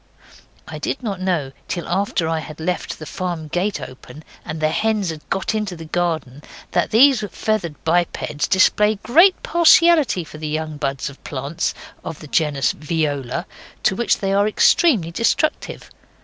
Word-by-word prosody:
(I - - -7
did 270 - -3
not 200 -5 -3
know 170 -8 -1 0.2
till 175 - -4
after 185 -2 0
I 160 0 0
had 155 +1 -9
left 180 +3 -3
the 155 - -9
farm 175 -3 -4
gate 190 +6 -1
open, 135 +4 -11 0.2
and 155 +1 -6
the 155 0 +2
hens 215 -4 0
had 155 -1 -8
got 195 +3 -1
into 210 -4 -2
the 165 -1 -9
garden, 160 -5 -2 0.3
that - - +1
these 250 0 +5
feathered 205 -8 -2
bipeds 165 -3 0
display 210 +2 +4
a 205 - -13
great 345 - +5
partiality 340 - +5
for 155 -1 -12
the 155 - -4
young 155 0 -3
buds 135 -2 -2
of 140 -1 -11
plants 140 +3 -3 0.3
of 160 - -6
the - - -10
genus 145 -4 +1
viola, 150 -1 -2 0.4
to 190 - +2
which 235 +2 +1
they 195 -1 -1
are 200 +1 +3
extremely 215 - +3
destructive. 230 - -1
175 Hz, 165 wpm, -20 LUFS, 155-210 Hz, 0.4 s, these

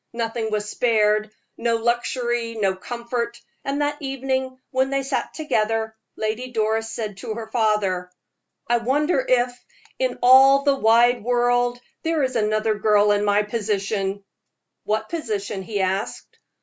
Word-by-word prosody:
Nothing 225 -1 -2
was 210 -1 -2
spared 215 -2 +2 0.3
no 230 0 +1
luxury, 240 0 -1
no 195 -3 +1
comfort; 235 +3 -4 0.2
and 280 +1 -1
that 290 +1 -2
evening, 265 -1 -2
when 260 +1 +1
they 275 0 0
sat 270 +1 -2
together, 220 -7 -1 0.2
Lady 220 +4 -3
Doris 220 -1 0
said 215 -4 -5
to 215 +2 -5
her 230 -1 -5
father: 210 -6 +1 0.6
"I 240 - +3
wonder 270 +4 +1
if, 245 -1 +2 0.4
in - - 0
all 270 +2 +7
the 280 -1 +4
wide 235 -1 +4
world, 245 0 +1 0.2
there 320 -3 0
is 260 -1 -1
another 215 0 +1
girl 210 0 +4
in 205 0 +2
my 205 0 +3
position." 205 -2 -2 0.6
"What 215 +1 -1
position?" 210 - -3
he 200 +1 -3
asked. 190 +3 -3
230 Hz, 140 wpm, -23 LUFS, 215-255 Hz, 0.6 s, all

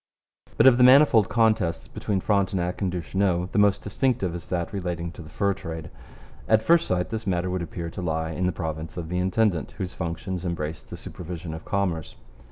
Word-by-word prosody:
But - - +5
of 130 -2 +7
the - - +7
manifold 130 -5 +7
contests 110 -7 +1
between 100 -3 -2
Frontenac 95 -3 0
and 95 -2 0
Duchesneau 90 +2 0
the - - +1
most 100 -1 +3
distinctive 105 -4 0
is 85 - -7
that 85 +1 -2
relating 85 -3 -3
to 85 - -11
the 80 - -11
fur 100 +5 0
trade. 80 -4 -7 0.6
At 110 0 +4
first 170 +5 +4
sight 90 -1 0
this 110 -1 -4
matter 90 -1 0
would 90 -1 -1
appear 85 0 -5
to 95 - -6
lie 80 -1 -1
in 90 +3 -1
the - - +1
province 80 -1 -5
of 85 -2 -5
the 90 +1 -1
intendant, 95 -2 +1
whose 90 -1 -4
functions 85 +1 -4
embraced 80 -3 -4
the - - -7
supervision 85 -1 -7
of 80 - -8
commerce. 90 -6 -2
90 Hz, 195 wpm, -25 LUFS, 85-100 Hz, 0.6 s, of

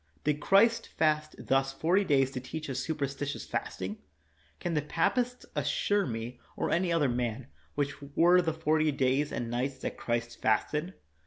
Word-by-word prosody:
Did 150 0 +1
Christ 230 +8 +4
fast 155 -1 0
thus 135 0 +1
forty 175 +8 +2
days 135 -6 +3
to 130 - -4
teach 145 +3 -6
us 130 - -2
superstitious 140 -1 -3
fasting? 95 +3 -4 0.6
Can 175 - -2
the 150 - +2
papists 245 - 0
assure 205 -1 +1
me, 120 +1 -5 0.2
or - - -1
any 175 +1 +2
other 165 -4 +3
man, 120 0 -2 0.3
which 140 -1 -2
were 175 +2 +6
the 165 -2 0
forty 155 -1 +2
days 135 +1 +1
and 120 -1 -3
nights 130 +3 -1
that - - -3
Christ 120 0 -2
fasted? 150 - +1
145 Hz, 160 wpm, -30 LUFS, 130-165 Hz, 0.6 s, were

